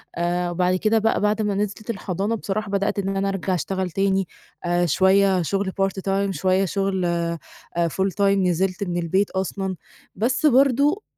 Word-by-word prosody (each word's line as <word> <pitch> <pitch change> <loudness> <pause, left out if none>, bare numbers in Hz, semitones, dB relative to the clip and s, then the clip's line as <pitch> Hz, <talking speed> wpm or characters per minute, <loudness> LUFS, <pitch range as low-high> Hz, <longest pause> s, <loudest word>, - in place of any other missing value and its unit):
آآ، 175 +1 0
وبعد 180 +1 +1
كده 215 +4 +2
بقى 225 +1 +1
بعد 210 +1 +1
ما 210 -2 0
نزلِت 210 +1 -3
الحضانة 200 0 -2
بصراحة 210 0 -3
بدأت 200 +1 0
إن 195 0 -2
أنا 195 0 0
أرجع 195 -1 -2
أشتغل 185 +1 -2
تاني، 195 +1 +1 0.4
آآ، 175 0 +2
شويّة 190 +2 +3
شغل 195 +4 -1
Part 195 0 0
Time 195 0 +1
شويّة 190 +1 +1
شغل 195 0 -1
آآ، 170 -1 -1 0.5
Full 190 +4 0
Time - - +1
نزلت 190 -1 +2
من 175 -3 -2
البيت 185 +4 +1
أصلًا، 190 0 -2 0.4
بس 250 +7 0
برضو، 280 - +4
195 Hz, 165 wpm, -23 LUFS, 185-200 Hz, 0.5 s, برضو